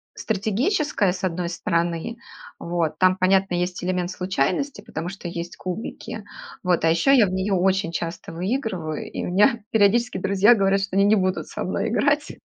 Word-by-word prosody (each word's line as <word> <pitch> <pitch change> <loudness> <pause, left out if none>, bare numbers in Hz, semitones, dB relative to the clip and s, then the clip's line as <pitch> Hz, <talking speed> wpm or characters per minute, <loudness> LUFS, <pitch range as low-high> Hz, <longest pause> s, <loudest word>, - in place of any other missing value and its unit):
стратегическая, 220 - 0
с 190 - -8
одной 180 -1 -1
стороны, 170 +4 -2 0.4
вот. 170 -3 -2
Там, 185 +1 +4
понятно, 190 0 +2
есть 180 +1 -2
элемент 180 -1 -1
случайности, 185 - -1
потому 170 -3 -5
что 190 -2 -8
есть 170 0 -6
кубики. 185 +4 -6 0.4
Вот, 180 -2 +1
а - - +4
еще 170 +12 +4
я 225 -6 +5
в - - -3
неё 190 +2 -1
очень 185 -2 +1
часто 170 +1 -5
выигрываю, 185 - -3
и - - -4
меня 210 +5 +3
периодически 220 +1 +3
друзья 200 +4 +4
говорят, 195 -1 +2
что 195 -1 -4
они 195 - +4
не 210 +2 +5
будут 185 -2 0
со - - -5
мной - - -2
играть. - - +1
185 Hz, 170 wpm, -23 LUFS, 175-205 Hz, 0.4 s, я